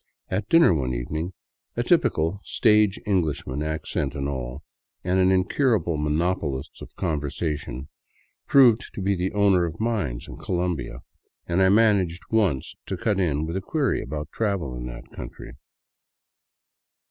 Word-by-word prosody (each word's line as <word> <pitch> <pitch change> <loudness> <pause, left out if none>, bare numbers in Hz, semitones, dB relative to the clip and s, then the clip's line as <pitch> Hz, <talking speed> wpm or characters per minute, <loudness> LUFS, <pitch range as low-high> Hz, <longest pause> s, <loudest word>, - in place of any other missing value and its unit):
At 95 +2 -2
dinner 165 - +6
one 65 -5 -1
evening 80 +9 -3 0.4
a - - +1
typical, 80 +6 +2
stage 105 -3 +3
Englishman, 80 -8 -1
Accent 75 -2 -2
and 70 0 -2
all, 65 +1 -5 0.4
and 90 +1 +1
an 95 0 +4
incurable 95 - +2
monopolist 75 -2 -1
of - - -7
the - - -40
con 80 -6 -1
versation, 70 -2 -4 0.6
proved 125 -4 +5
to - - -4
be 100 +1 +2
the 90 +1 -1
owner 100 -3 +4
of 85 -1 -6
mines 105 - -2
in - - -9
Colombia, 85 -8 -2 0.4
and 90 +2 +1
I 95 - +5
man 105 0 +5
aged 85 -2 -4
once 100 - +1
to - - -3
cut 105 -3 0
in 80 -4 +1
with 85 +2 -4
a 95 - -1
query 140 - 0
about 75 +2 -5
travel 100 - -1
in - - -5
that - - -8
country. - - -9
85 Hz, 155 wpm, -25 LUFS, 75-100 Hz, 0.6 s, dinner